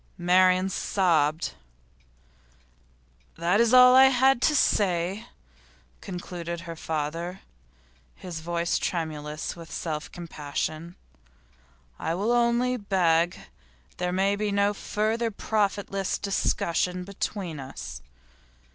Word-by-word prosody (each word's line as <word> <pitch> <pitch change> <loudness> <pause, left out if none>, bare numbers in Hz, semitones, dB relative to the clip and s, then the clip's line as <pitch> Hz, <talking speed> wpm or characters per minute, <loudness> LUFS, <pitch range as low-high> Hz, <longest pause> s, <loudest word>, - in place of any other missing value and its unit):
Marian 185 +1 +4
sobbed. 165 -5 +1 1.8
'That's 200 +8 +2
all 250 0 +8
I 265 +1 +9
had 265 -1 +4
to 300 - +3
say,' 195 -2 +1 0.7
concluded 175 -2 -6
her 170 0 -7
father, 165 +4 -4 0.7
his 175 -3 -7
voice 170 +1 -1
tremulous 155 -2 -3
with 165 -1 -11
self 155 -2 -4
compassion. 160 0 -5 1.0
'I 165 +1 -2
will 205 +6 0
only 240 +1 +2
beg 175 -5 +2 0.6
that - - -30
there 180 0 -1
may 195 +2 +1
be 210 0 -2
no 200 +1 +2
further 220 +3 -1
profitless 200 -2 -1
discussion 180 -2 -1
between 190 -4 -4
us. 135 0 -8
180 Hz, 100 wpm, -26 LUFS, 170-205 Hz, 1.8 s, I